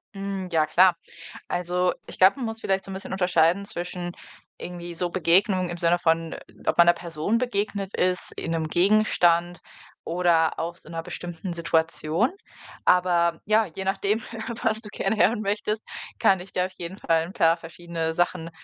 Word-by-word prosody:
Hm, 195 -2 -4
ja 155 -2 +3
klar. 180 +2 +5 0.5
Also, 180 +1 0
ich - - -9
glaube, 190 +7 +6
man 260 - -4
muss 225 0 -5
vielleicht 195 0 0
so 195 - -7
'n - - -5
bisschen 190 0 -7
unterscheiden 180 0 +2
zwischen 175 -1 -4 0.4
irgendwie 175 -1 -7
so 175 +1 -2
Begegnungen 185 +1 +2
im 175 - -5
Sinne 170 +1 +2
von, 165 -1 0 0.3
ob - - +1
man 170 - +8
'ner 175 - +7
Person 170 +6 -2
begegnet 205 -4 -2
ist, 180 0 0
in 165 - -3
'nem 160 -1 -1
Gegenstand 175 -3 +3 0.5
oder 170 -2 +2
auch 170 +1 -3
so - - -16
'ner 165 0 -5
bestimmten 175 +2 -6
Situation. 165 - +1 0.5
Aber 175 -2 +3
ja, 215 0 +3
je 190 +4 -7
nachdem, 200 +3 0 0.4
was 220 0 +1
du 210 - -7
gerne 220 - -1
hören 215 +1 +3
möchtest, 210 +1 -2 0.4
kann 190 - +4
ich 185 +2 -11
dir 180 0 +1
auf 185 - -12
jeden 175 +3 -6
Fall 165 -4 +1
'n 175 - -9
paar 165 -2 +3
verschiedene 165 -1 -5
Sachen 175 -1 -1
175 Hz, 175 wpm, -25 LUFS, 170-195 Hz, 0.5 s, man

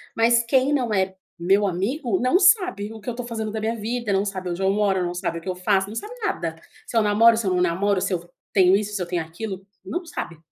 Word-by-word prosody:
mas 235 +1 +4
quem 260 +4 +2
não 245 -6 0
é 190 -1 0 0.2
meu 195 +4 +3
amigo 205 - -1
não 255 +9 +3
sabe 365 - +3
o 220 - -10
que 210 - -5
eu - - 0
estou 245 +1 -6
fazendo 220 -2 -4
da 220 - -3
minha 220 +2 -1
vida, 230 0 -2
não 195 +1 +1
sabe 185 -2 -4
onde 175 +2 -4
eu 190 - +2
moro, 195 -2 +1
não 175 0 -2
sabe 170 -1 -3
o - - -17
que 185 - -6
eu 185 - -2
faço, 190 +1 +1
não 215 - -8
sabe 420 - -5
nada, 170 - -2 0.3
se - - -9
eu - - +5
namoro, 220 +2 +5
se 230 - -1
eu 185 - +2
não 180 - +1
namoro, 185 +3 +1
se 190 - -1
eu 180 - 0
f 175 +1 -18 0.2
tenho 185 -1 +5
isso, 210 +1 -2
se 195 - -2
eu - - -1
tenho 175 -1 -1
aquilo, 190 +4 -7 0.2
não 350 +1 -4
sabe. 170 - -6
205 Hz, 275 wpm, -23 LUFS, 185-230 Hz, 0.3 s, eu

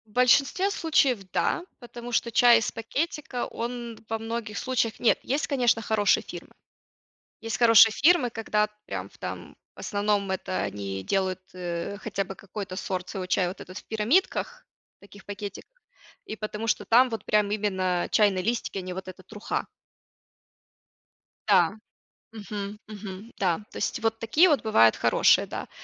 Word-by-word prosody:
В 215 - -24
большинстве 275 - +3
случаев 295 - +2
да, 345 - 0 0.2
потому 240 -1 -9
что 235 0 0
чай 240 +1 +6
из 225 - -2
пакетика 275 +2 -3
он 235 -1 -6
во 225 - -1
многих 225 -2 -5
случаях 245 -4 -1
Нет, 235 - +3
есть 280 +4 -1
конечно, 245 -5 +2
хорошие 215 -2 +2
фирмы. - - -10 0.9
Есть 225 0 -4
хорошие 230 -2 +7
фирмы, 285 -1 +4
когда 215 -2 0 0.2
прям - - -5
в - - -22
там - - -7 0.2
в - - -22
основном, 205 -1 0
это 185 0 -2
они 95 -1 -4
делают, 190 - 0
э, 175 +2 -4
хотя 200 -2 -3
бы 195 - -8
какой-то 195 -1 -7
сорт 185 -1 -4
своего 190 -2 -5
чая 180 0 +1
вот 180 - -8
этот 185 +1 -8
в - - -14
пирамидках, 365 - 0 0.3
таких 200 0 -16
пакетиках. 205 - -8 0.5
И - - -6
потому 215 +1 -5
что 225 - 0
там 250 +3 +5
вот 225 - -5
прям 210 -1 +2
именно 190 -4 0
чайные 200 -3 +3
листики, 230 -1 -2
а - - -2
не 185 0 -6
вот 190 +1 -6
эта 185 0 -10
труха. 210 +2 -4 1.8
Да, 190 -2 +4 0.6
мгм, 205 -1 -6
мгм, 205 +1 -9
да. 180 -4 +1
То - - -14
есть - - -2
вот 225 0 0
такие 295 +12 +4
вот 290 -8 +2
бывают 115 - +4
хорошие, - - +4
да. - - -6
215 Hz, 160 wpm, -26 LUFS, 195-235 Hz, 1.8 s, хорошие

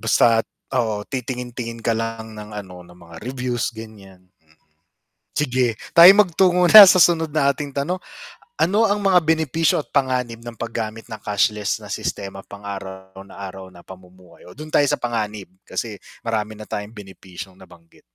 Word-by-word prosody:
Basta't, 115 -1 +3 0.2
oo 110 -5 -1
titingin-tingin 125 -2 -6
ka 115 - +2
lang 115 0 -5
ng 105 0 -9
ano 90 -3 -9
ng 90 - -17
mga 85 -2 -15
reviews 125 -1 -3
ganiyan, 100 -5 -13 0.2
mm. 80 0 -30 0.8
Sige, 125 -5 0 0.2
tayo'y 175 +4 +10
magtungo 180 -2 +3
na 215 +4 +12
sa - - +5
sunod 165 -2 +4
nating 145 -1 0
tanong. 175 +7 -2 0.6
Ano 210 +6 +3
ang 205 -1 +1
mga 190 -3 +4
benepisyo 160 0 +1
at - - -11
panganib 125 -4 -1
ng 120 - -7
paggamit 115 -1 -5
ng 110 - -6
cashless 105 0 0
na - - -11
sistema 95 -1 -5
pang-araw 95 -2 -9
na - - -15
araw 95 -1 -8
na 90 - -15
pamumuhay? 95 -1 -16
Oh, 90 - -13
do'n 155 +3 -9
tayo 145 - +3
sa - - 0
panganib, 110 -4 -3 0.2
kasi 115 -3 -5 0.3
marami 110 -1 -3
na 110 - -10
tayong 105 +1 -5
benepisyong 95 -2 -11
nabanggit. 85 -3 -19
115 Hz, 160 wpm, -21 LUFS, 100-140 Hz, 0.8 s, na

